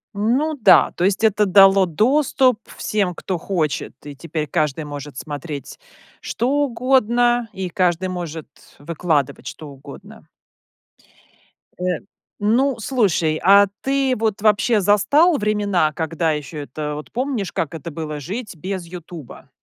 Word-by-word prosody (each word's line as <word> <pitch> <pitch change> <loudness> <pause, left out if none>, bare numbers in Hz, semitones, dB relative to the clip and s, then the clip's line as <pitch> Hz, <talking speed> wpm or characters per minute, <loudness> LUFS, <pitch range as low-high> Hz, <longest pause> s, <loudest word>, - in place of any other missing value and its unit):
Ну 250 +10 +1
да, - - +6
то - - -4
есть 200 +2 0
это 210 -1 +3
дало 195 0 +6
доступ 255 - +2 0.2
всем, 200 -5 -1
кто 180 0 -4
хочет, 160 -5 -2
и 145 -1 -8
теперь 155 +1 -4
каждый 150 +1 -1
может 145 -2 -8
смотреть, 145 0 -7 0.4
что 240 - -2 0.2
угодно, 240 -1 +1
и 190 -3 -4
каждый 180 0 0
может 170 -4 -6 0.3
выкладывать, 150 -2 -2
что 155 - -8
угодно. 135 -1 -13 1.5
Э, 180 -2 -1 0.4
ну, 245 +6 +2
слушай, 195 -10 +1
а 200 +2 +7
ты 270 -1 +1
вот, 215 -2 -1
вообще, 215 +1 +3
застал 285 - +4
времена, 205 - +1
когда 160 +1 -1
еще 150 0 -5
это 150 +2 -5
вот, 150 - -9
помнишь, 245 -6 -2
как 160 - -3
это 165 +1 -7
было 155 -1 -5
жить 205 - -6
без 185 +2 -5
"Ютуба"? 170 -5 -11
185 Hz, 130 wpm, -20 LUFS, 155-225 Hz, 1.5 s, а